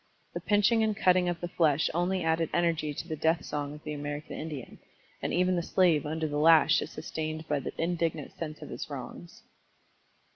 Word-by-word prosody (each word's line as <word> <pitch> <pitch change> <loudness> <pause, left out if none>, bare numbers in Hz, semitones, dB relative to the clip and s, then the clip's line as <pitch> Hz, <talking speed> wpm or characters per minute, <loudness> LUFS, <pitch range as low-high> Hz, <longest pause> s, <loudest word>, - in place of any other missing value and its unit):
The - - -4
pinching 210 +2 +3
and 215 -2 +1
cutting 180 -1 +4
of 175 -1 -3
the 175 - -2
flesh 160 -3 +2
only 180 +2 0
added 160 0 +1
energy 165 -3 +1
to 145 - -6
the 160 - -3
death 160 +2 +1
song 145 0 -4
of 150 - -13
the 150 - -4
American 145 +1 -5
Indian, 150 -5 -7 0.4
and - - -2
even 180 +1 +2
the 175 - +1
slave 170 -4 +2
under 160 +1 -2
the 145 0 -2
lash 160 0 +6
is - - -5
sustained 155 0 -5
by 150 -2 0
the - - -7
indignant 165 -3 -1
sense 155 -2 -6
of - - -9
his - - -6
wrongs." 170 - -8
160 Hz, 195 wpm, -29 LUFS, 150-175 Hz, 0.4 s, lash